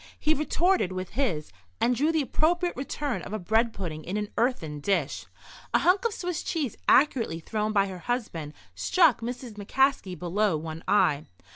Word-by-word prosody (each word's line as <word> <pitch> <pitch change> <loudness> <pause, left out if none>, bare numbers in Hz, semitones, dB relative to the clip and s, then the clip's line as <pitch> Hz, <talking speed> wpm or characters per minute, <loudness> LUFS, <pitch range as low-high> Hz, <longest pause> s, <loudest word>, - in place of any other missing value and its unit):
He 310 - +3
retorted 315 - +1
with 185 0 -5
this, 215 - -1 0.3
and 245 - +3
drew 295 +6 +2
the 320 -2 +1
appropriate 350 +6 +1
return 275 0 -3
of - - -8
a - - 0
bread 220 +5 +2
pudding 165 -7 -5
in 190 +4 -3
an 210 -1 -2
earthen 165 - 0
dish. 170 -3 -1 0.5
A - - +8
hunk 370 +5 +3
of 465 - +2
Swiss 355 -2 -3
cheese 300 -8 -2
accurately 250 - +3
thrown 215 +5 -2
by 200 -2 +3
her 190 -2 -7
husband 175 -10 -3 0.2
struck 295 - +3
Mrs. 240 -1 -6
McCaskey 240 -6 +1
below 180 0 +1
one 160 +1 -6
eye. 155 -7 +3
220 Hz, 170 wpm, -27 LUFS, 180-280 Hz, 0.5 s, A